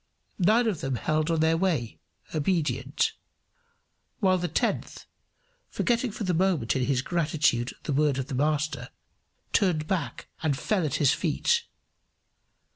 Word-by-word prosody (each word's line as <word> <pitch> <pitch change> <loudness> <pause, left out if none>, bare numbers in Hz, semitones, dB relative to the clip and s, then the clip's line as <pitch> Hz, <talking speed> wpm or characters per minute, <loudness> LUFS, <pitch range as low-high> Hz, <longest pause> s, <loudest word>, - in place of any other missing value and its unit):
Nine 215 +6 +4
of 205 -8 -1
them 135 -1 -1
held 155 +6 0
on 165 -1 +1
their 160 0 +3
way, 165 -11 -1 0.3
obedient; 155 0 0 1.1
while 185 -3 +3
the 175 - -1
tenth, - - -2 0.6
forgetting 240 0 0
for 215 - -5
the 185 -2 0
moment 170 -9 +1
in 130 -1 +1
his 130 -2 +1
gratitude 155 -8 +1
the 145 - -2
word 145 -1 +2
of 135 - -2
the 135 - -7
Master, 145 -2 0 0.6
turned 170 -6 +2
back 170 -2 -3
and 150 -5 0
fell 185 +8 0
at 135 - -2
his 145 -2 +4
feet. 470 - +1
155 Hz, 140 wpm, -27 LUFS, 140-185 Hz, 1.1 s, Nine